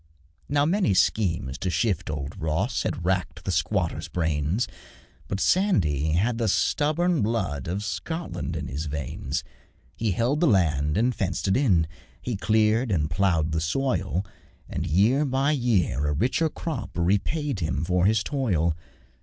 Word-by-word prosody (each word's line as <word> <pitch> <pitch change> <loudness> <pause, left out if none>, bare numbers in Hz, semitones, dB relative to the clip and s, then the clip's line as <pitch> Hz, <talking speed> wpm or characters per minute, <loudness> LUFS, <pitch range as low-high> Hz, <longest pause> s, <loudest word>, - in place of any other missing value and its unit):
Now 145 0 +3
many 180 - +2
schemes 85 - +1
to 95 - -1
shift 90 +1 0
old 75 -1 -4
Ross 95 +11 0
Had 85 - -3
racked 90 0 -1
the - - 0
squatter's - - 0
brains, 80 - 0 0.6
But 100 - -3
Sandy 80 - +2
had 115 +8 +1
the 115 - +1
stubborn 155 - +2
blood 95 - -1
Of 95 +5 -2
Scotland 160 - -4
in 75 -2 -3
his 70 +4 -4
veins; 70 -3 -3 0.5
He 115 - -1
held 120 - +1
the 175 - +3
land 75 - +2
and 120 +3 +2
fenced 95 -2 -2
it 95 - +3
in, 100 - +3 0.3
He 120 - -3
cleared 110 +3 +2
and 75 -5 0
ploughed 80 -2 +1
the 80 0 0
soil, 95 -2 -1 0.4
And - - -3
year 105 - +3
by 135 +1 +1
year 100 - +1
a 75 - +1
richer 130 - +1
crop 155 -4 -4
Repaid 105 - 0
him 80 -2 -1
for 90 +2 +2
his 110 0 +2
toil. 90 - 0
95 Hz, 155 wpm, -25 LUFS, 80-125 Hz, 0.6 s, Now